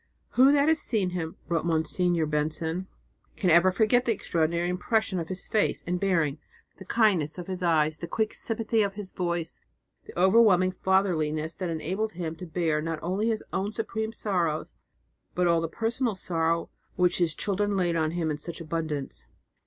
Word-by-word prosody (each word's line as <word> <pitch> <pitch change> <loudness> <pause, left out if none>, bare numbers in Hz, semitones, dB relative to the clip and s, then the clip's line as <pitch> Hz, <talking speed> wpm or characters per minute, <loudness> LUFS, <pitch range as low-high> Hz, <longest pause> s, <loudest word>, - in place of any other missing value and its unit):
"Who 260 +3 +5
that 285 0 +3
has 320 0 +3
seen 200 -6 0
him," 165 -3 -4
wrote 165 -3 0
Monsignor 165 +1 +1
Benson, 160 +4 -2 0.5
"can 185 -4 +1
ever 170 +3 +6
forget 235 +5 +3
the 235 - +2
extraordinary 170 -4 0
impression 190 +2 0
of 165 - -4
his 185 +1 -6
face 215 - +1
and 180 +1 -1
bearing, 165 -7 +1 0.4
the 190 - -10
kindness 190 -9 +2
of 180 - -6
his 185 0 -5
eyes, 155 -3 +2
the 170 - -5
quick 220 +5 -1
sympathy 225 0 0
of 200 -1 -1
his 200 -2 -7
voice, 170 -2 -3 0.5
the - - -7
overwhelming 190 -1 +5
fatherliness 165 -5 0
that 185 -2 -3
enabled 190 +7 -2
him 165 -2 -4
to 180 - -8
bear 160 -2 0
not 165 0 -3
only 190 +6 0
his 225 -2 -1
own 195 +2 -1
supreme 220 -1 -3
sorrows, 175 -8 -1 0.6
but 180 - +2
all 170 -1 +3
the 165 - -1
personal 225 +3 -1
sorrow 165 -2 -1 0.2
which 180 0 +2
his 165 -3 +2
children 205 0 -1
laid 175 -2 +1
on 160 -1 +1
him 165 -1 -1
in 150 - -4
such 170 +3 -6
abundance?" 155 - -4
180 Hz, 175 wpm, -27 LUFS, 165-200 Hz, 0.6 s, ever